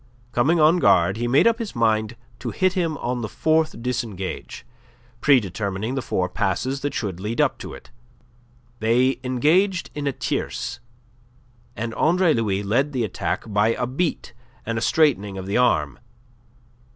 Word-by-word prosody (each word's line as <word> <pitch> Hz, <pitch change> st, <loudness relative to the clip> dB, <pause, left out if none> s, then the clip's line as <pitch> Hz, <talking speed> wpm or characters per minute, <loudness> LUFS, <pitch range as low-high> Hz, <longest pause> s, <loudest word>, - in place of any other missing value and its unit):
Coming 140 Hz, +8 st, +2 dB
on 160 Hz, +3 st, +5 dB
guard, 90 Hz, -, +4 dB
he 120 Hz, +1 st, -1 dB
made 130 Hz, +4 st, +4 dB
up 230 Hz, 0 st, +3 dB
his 225 Hz, -3 st, -5 dB
mind 110 Hz, -1 st, +1 dB, 0.2 s
to -, -, -4 dB
hit 185 Hz, -1 st, +1 dB
him 165 Hz, -5 st, -1 dB
on 125 Hz, -1 st, -3 dB
the 110 Hz, -, -4 dB
fourth 155 Hz, -5 st, 0 dB
disengage, 115 Hz, -7 st, -4 dB, 0.5 s
predetermining 105 Hz, -, +1 dB
the 135 Hz, -, -1 dB
four 90 Hz, -6 st, -1 dB
passes 115 Hz, +8 st, -1 dB
that 145 Hz, -, -3 dB
should 95 Hz, -6 st, -3 dB
lead 105 Hz, +4 st, -4 dB
up -, -, +2 dB
to -, -, -7 dB
it. -, -, -15 dB, 0.9 s
They 125 Hz, +4 st, +2 dB
engaged 165 Hz, +10 st, +1 dB
in 145 Hz, -1 st, -2 dB
tierce, -, -, -3 dB, 1.0 s
and 115 Hz, +2 st, -4 dB
Andre 170 Hz, +3 st, +3 dB
Louis 105 Hz, -4 st, 0 dB
led 130 Hz, +8 st, +1 dB
the 125 Hz, -3 st, 0 dB
attack 105 Hz, -, -2 dB
by 105 Hz, +2 st, +2 dB
a -, -, -1 dB
beat 135 Hz, -1 st, -2 dB, 0.3 s
and 115 Hz, -1 st, -2 dB
a -, -, -7 dB
straightening 115 Hz, -11 st, +2 dB
of 95 Hz, -, -6 dB
the 100 Hz, +4 st, -1 dB
arm. 125 Hz, 0 st, +2 dB
120 Hz, 155 wpm, -23 LUFS, 105-150 Hz, 1.0 s, on